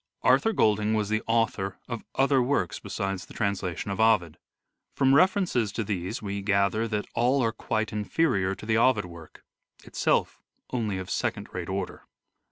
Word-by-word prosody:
Arthur 225 - +4
Golding 110 - +2
was 105 -1 0
the 110 0 +1
author 110 -4 0
of 120 -3 -5
other 135 0 +3
works 120 -9 0
besides 95 -1 -4
the - - -14
translation 100 -2 -2
of 95 - -4
Ovid. 110 -8 +3 0.6
From 135 -1 +3
references 180 - +3
to 115 - -2
these 100 +2 -4
we 100 0 -3
gather 100 +3 +1
that 105 -2 -2
all 125 +3 +2
are 115 - +1
quite 110 -1 -2
inferior 105 -3 0
to - - -11
the 110 0 +2
Ovid 115 -5 +3
work: 85 -2 -13 0.4
itself - - 0 0.3
only 110 -6 -1
of 95 -1 -6
second - - -2
rate 90 -1 -5
order. 95 -1 -4
105 Hz, 165 wpm, -27 LUFS, 95-120 Hz, 0.6 s, Arthur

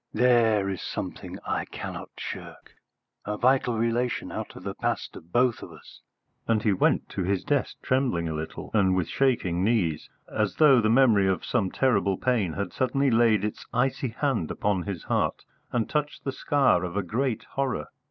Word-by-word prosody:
"There 115 -4 +4
is 95 -3 -3
something - - -5
I - - -1
cannot - - -7
shirk - - -8 0.5
a 105 0 -3
vital 125 -1 +2
relation 115 +2 -1
out - - -6
of - - -10
the - - -4
past - - -3
of 85 +2 -12
both 125 +1 +2
of - - -9
us." - - -15 0.5
And 110 -2 +2
he 105 - +3
went 95 - +2
to 95 - -3
his 95 +1 0
desk 145 -2 -1
trembling 125 -11 +1
a 80 - -3
little, 80 +1 -6
and 95 -4 +3
with 90 -3 0
shaking 95 -10 +1
knees, 95 -9 0 0.2
as 105 -2 -1
though 140 -6 +6
the 110 - +2
memory 115 -5 +5
of 95 -3 0
some 105 -7 0
terrible 110 -7 +1
pain 110 -10 0
had 100 +2 -4
suddenly 135 +1 +1
laid 115 -3 +4
its 105 - -5
icy 130 +2 +1
hand 115 - -1
upon 100 -3 0
his 95 -3 -5
heart - - -1 0.3
and 115 -2 0
touched 150 -1 -2
the 135 - -2
scar 135 -9 +2
of 90 +2 -4
a 100 - +1
great 120 +5 -1
horror. 130 - -2
110 Hz, 180 wpm, -26 LUFS, 95-125 Hz, 0.5 s, though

